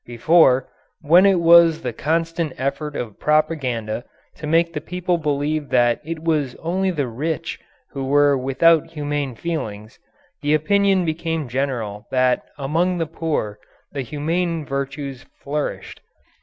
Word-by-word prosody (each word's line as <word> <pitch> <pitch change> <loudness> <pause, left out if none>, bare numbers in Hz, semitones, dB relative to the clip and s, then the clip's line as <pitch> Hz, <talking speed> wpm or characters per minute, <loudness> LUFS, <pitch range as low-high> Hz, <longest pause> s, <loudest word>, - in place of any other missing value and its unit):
Before, 130 +2 +4 0.3
when 170 +5 +6
it 190 -3 +4
was 170 -1 +6
the 125 - -3
constant 165 +1 -1
effort 140 +3 -3
of 110 -4 -5
propaganda 135 -8 0 0.3
to 150 - -6
make 165 +2 +2
the 150 - -4
people 180 +1 -2
believe 150 0 -1
that 120 -1 +2
it 160 +1 -6
was 150 -6 0
only 185 +3 -1
the 150 -6 -1
"rich" 155 +7 -4 0.3
who 135 -2 -4
were 145 +1 +4
without 135 +5 +3
humane 145 -4 -3
feelings, 110 -10 -5 0.4
the 150 +1 +2
opinion 195 +3 +2
became 160 -2 -2
general 120 -5 -3
that 130 -1 +2 0.2
among 165 +6 0
the 165 - 0
"poor" 155 -10 -3 0.3
the 140 - -3
humane 160 +4 -2
virtues 135 -1 -4 0.2
flourished. 145 +1 -4
150 Hz, 135 wpm, -21 LUFS, 135-165 Hz, 0.4 s, when